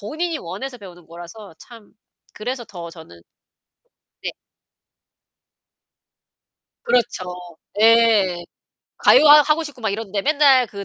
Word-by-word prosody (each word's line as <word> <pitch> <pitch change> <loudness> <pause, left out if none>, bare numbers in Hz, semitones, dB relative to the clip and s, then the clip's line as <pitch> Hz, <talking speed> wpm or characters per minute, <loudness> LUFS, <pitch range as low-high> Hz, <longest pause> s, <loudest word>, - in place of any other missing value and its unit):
본인이 315 +10 -4
원해서 245 +10 -8
배우는 175 -5 -14
거라서 175 +3 -12
참 230 -4 -16 0.4
그래서 245 +2 -6
더 170 -5 -10
저는 160 - -15 1.0
네. - - -4 2.5
그렇죠. 205 -7 -1 0.4
예. 220 -6 +3 0.6
가요 310 - +5
하 295 0 +8
하고 305 +3 0
싶고 290 -5 -10
막 220 -3 -2
이런데 200 -1 -4
맨날 285 -3 +3
그 200 -2 -9
220 Hz, 210 characters per minute, -20 LUFS, 185-260 Hz, 2.5 s, 하